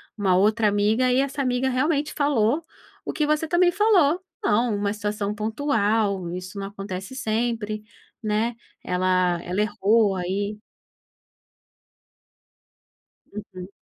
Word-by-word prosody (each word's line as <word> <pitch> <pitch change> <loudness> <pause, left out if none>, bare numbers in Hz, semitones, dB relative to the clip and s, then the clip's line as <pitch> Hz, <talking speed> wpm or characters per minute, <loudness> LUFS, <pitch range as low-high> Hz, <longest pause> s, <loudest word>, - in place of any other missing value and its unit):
uma 195 -4 +2
outra 215 +3 +3
amiga 210 +5 +2
e 250 - +3
essa 275 +1 -1
amiga 255 0 +1
realmente 295 +3 0
falou 285 0 +1 0.4
o - - -3
que 300 - 0
você 305 +1 +1
também 350 +2 +4
falou: 370 -5 +3 0.2
"Não, 225 +1 +2
uma 205 0 -1
situação 210 -1 -2
pontual, 215 -4 0
isso 185 +2 -7
não 195 - -4
acontece 195 +2 -7
sempre, 220 -2 -2 0.4
né". 220 +2 0 0.3
Ela 180 -1 +1
ela 180 +3 -3
errou 210 0 +2
aí. 200 +3 -3 2.7
Uhum. 200 -3 -8
215 Hz, 115 wpm, -24 LUFS, 200-260 Hz, 2.7 s, também